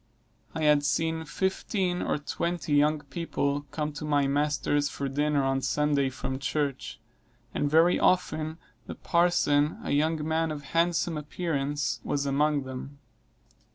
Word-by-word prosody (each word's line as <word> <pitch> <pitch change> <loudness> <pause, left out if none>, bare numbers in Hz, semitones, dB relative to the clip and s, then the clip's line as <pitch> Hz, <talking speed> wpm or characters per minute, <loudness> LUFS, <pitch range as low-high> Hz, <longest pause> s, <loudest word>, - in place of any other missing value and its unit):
I 160 - -2
have 150 -1 +4
seen 160 +2 0
fifteen 190 +1 -1
or - - 0
twenty 165 +2 -3
young 150 +1 +3
people 145 -2 -2
come 150 -1 -3
to 150 - -7
my 145 -2 +2
master's 145 0 +1
for 140 - -4
dinner 145 +1 +1
on 135 0 +1
Sunday 140 +1 +1
from 130 +1 -4
church; 135 - -2 0.5
and 145 - 0
very 165 +4 +4
often 160 -3 +1 0.3
the - - -6
parson, 170 -4 +2
a - - -3
young 155 +1 +1
man 160 0 +1
of 150 -2 -5
handsome 165 +2 +1
appearance, 145 -2 -2
was 140 0 -1
among 145 +1 +1
them. 130 +2 -8
150 Hz, 140 wpm, -28 LUFS, 140-160 Hz, 0.5 s, have